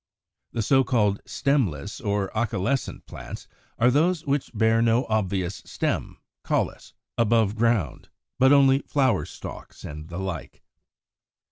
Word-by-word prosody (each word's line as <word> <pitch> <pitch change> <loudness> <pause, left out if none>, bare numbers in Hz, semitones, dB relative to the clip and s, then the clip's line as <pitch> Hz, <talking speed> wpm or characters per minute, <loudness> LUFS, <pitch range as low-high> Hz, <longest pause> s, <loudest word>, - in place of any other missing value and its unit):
The 115 - -1
so 135 +4 +4
called 105 -5 +1
stemless 105 - -1
or 100 -2 -1
acaulescent 110 +3 -1
plants - - -9 0.3
are 120 +2 +4
those 160 +4 +2
which 140 -1 0
bear 110 0 +2
no 115 +2 +3
obvious 95 -4 -1
stem - - -3 0.3
(caulis) - - -2 0.3
above 115 -2 +3
ground, 110 - 0 0.3
but 130 +1 +6
only 135 -1 +6
flower 135 -4 +1
stalks, - - -10
and 75 +2 -8
the 85 - -6
like. 95 -7 -6
115 Hz, 125 wpm, -25 LUFS, 100-130 Hz, 0.3 s, but